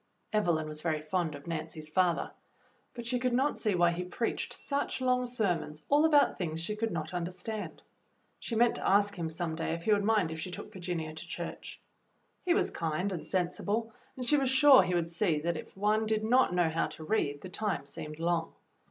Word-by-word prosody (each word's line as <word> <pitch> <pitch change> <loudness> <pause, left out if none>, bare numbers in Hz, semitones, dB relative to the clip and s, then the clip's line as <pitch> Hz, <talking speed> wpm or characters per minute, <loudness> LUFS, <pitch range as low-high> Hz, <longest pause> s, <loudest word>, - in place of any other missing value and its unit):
Evelyn 170 -7 +2
was 155 0 -7
very 155 -2 0
fond 155 0 -1
of 145 - -11
Nancy's 165 -2 -5
father, 175 +1 +1 0.6
but 235 -1 -6
she 250 +1 0
could 250 0 0
not 270 +4 +1
see 210 -4 +1
why 175 -1 +4
he 175 +1 -3
preached 180 +6 -2
such 280 -1 -2
long 250 -1 +1
sermons 175 -10 -2
all 295 +2 +5
about 295 -3 +4
things 165 -3 -2
she 190 +6 -2
could 225 +1 -1
not 165 -2 -4
understand. 180 +5 -5 0.6
She 230 - -4
meant 235 +1 +4
to - - -1
ask 205 +1 +4
him 170 -4 -3
some 165 0 -3
day 160 0 -2
if 170 - -8
he 215 - +2
would 205 0 +2
mind 205 -6 +2
if 160 - -5
she 180 - -4
took 180 - -8
Virginia 170 -4 -4
to 160 - -8
church. - - -6 0.6
He 360 -1 +3
was 405 - +1
kind 165 +4 -1
and 175 -4 -4
sensible, 205 +5 -1 0.2
and 250 - -4
she 295 +4 +4
was 270 -2 +1
sure 265 -1 +8
he 180 -1 0
would 170 -1 0
see 170 -3 +1
that 170 +2 -1
if 155 - -9
one 215 +2 +2
did 215 0 +1
not 250 +1 +4
know 175 -2 +2
how 160 +1 0
to 160 - -10
read, 150 -7 0
the 185 - -8
time 195 -8 -2
seemed 150 +2 -7
long. 165 0 -1
180 Hz, 215 wpm, -31 LUFS, 165-220 Hz, 0.6 s, sure